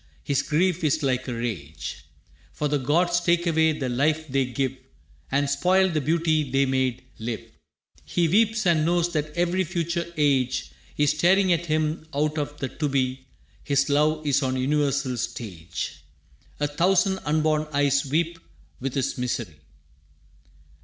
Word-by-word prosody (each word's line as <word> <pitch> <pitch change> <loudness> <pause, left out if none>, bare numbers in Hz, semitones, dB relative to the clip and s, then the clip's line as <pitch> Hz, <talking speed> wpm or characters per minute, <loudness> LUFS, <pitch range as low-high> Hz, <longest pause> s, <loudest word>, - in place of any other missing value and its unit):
His 140 -1 +1
grief 170 +4 +1
is 155 0 +1
like 130 -1 0
a 125 - -2
rage, 100 -11 -5 0.5
For 150 - -1
the 145 0 0
gods 175 +6 +2
take 175 0 +1
away 160 -1 +3
the 145 -4 -3
life 155 +6 0
they 135 -1 +1
give 130 +1 -2 0.6
And 140 +1 +2
spoil 185 +7 +3
the 155 -3 0
beauty 155 -1 +1
they 135 +2 +2
made 130 -2 0 0.2
live. 115 0 -4 0.6
He 170 -2 +1
weeps 215 +4 +2
and 165 -3 +3
knows 175 +1 +1
that 150 -1 -1
every 175 +2 +2
future 170 0 -2
age 135 -4 +1 0.3
Is 145 -1 +3
staring 185 +4 +4
at 170 0 -2
him 155 0 -1
out 150 +2 0
of 145 0 -4
the 135 - -3
to 150 +3 -3
be. 130 -1 -1 0.4
His 140 -1 +1
love 155 +2 +2
is 140 -1 +2
on 130 -1 0
a - - -1
universal 140 -2 0
stage. 85 - -5 0.6
A 145 - +1
thousand 185 +6 +2
unborn 155 0 +1
eyes 140 -1 +2
weep 165 +4 -1 0.4
with 135 +1 -4
his 135 -1 -1
misery. 115 -10 -3
150 Hz, 155 wpm, -25 LUFS, 135-170 Hz, 0.6 s, staring